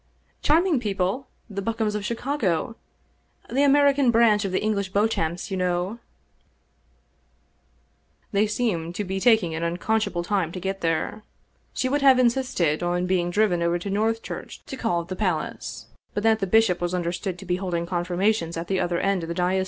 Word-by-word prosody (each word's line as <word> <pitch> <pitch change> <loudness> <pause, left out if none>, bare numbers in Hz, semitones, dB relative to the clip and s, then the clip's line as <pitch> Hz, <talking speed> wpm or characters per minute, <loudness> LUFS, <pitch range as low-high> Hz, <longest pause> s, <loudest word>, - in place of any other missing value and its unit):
" - - -41
Charming 320 -1 +3
people, 205 +4 -1 0.2
the 200 -3 -5
Bokums 220 0 -1
of 210 -1 -3
Chicago, 230 - -1 0.8
the 270 - +2
American 285 -1 +4
branch 225 -2 +4
of 195 - -2
the 185 - +1
English 200 -3 0
Beauchamps, 190 -4 0
you 190 - -1
know! 180 +4 -1 1.5
" - - -41
They 210 0 +2
seemed 185 -7 -1
to 210 - -2
be 190 0 -3
tak 220 0 +5
ing 165 -2 -3
an 160 - -3
unconscionable 180 +2 -1
time 180 -3 0
to 185 - -5
get 195 +1 -3
there. 165 +6 -1 0.5
She 255 - 0
would 285 +2 0
have 270 -2 +6
insisted 235 - +1
on 175 +1 0
being 180 -1 +1
driven 180 -2 +2
over 170 +1 +1
to 195 +3 -5
Northchurch 225 +3 -3
to - - -6
call 200 -9 -1
at - - -17
the 185 - -3
palace, 155 - -3 0.3
but 205 - -1
that 220 -1 +4
the 195 - -1
Ij^shop 205 -3 +3
was 175 +1 -1
understood 180 +1 -2
to 195 - -10
be 180 0 0
holding 175 -3 -2
confirmations 175 0 0
at 165 +1 -4
the 190 -1 +1
other 175 -1 0
end 195 0 +1
of - - -4
the 170 - -3
diocese. 180 +2 +1
195 Hz, 185 wpm, -24 LUFS, 175-225 Hz, 1.5 s, have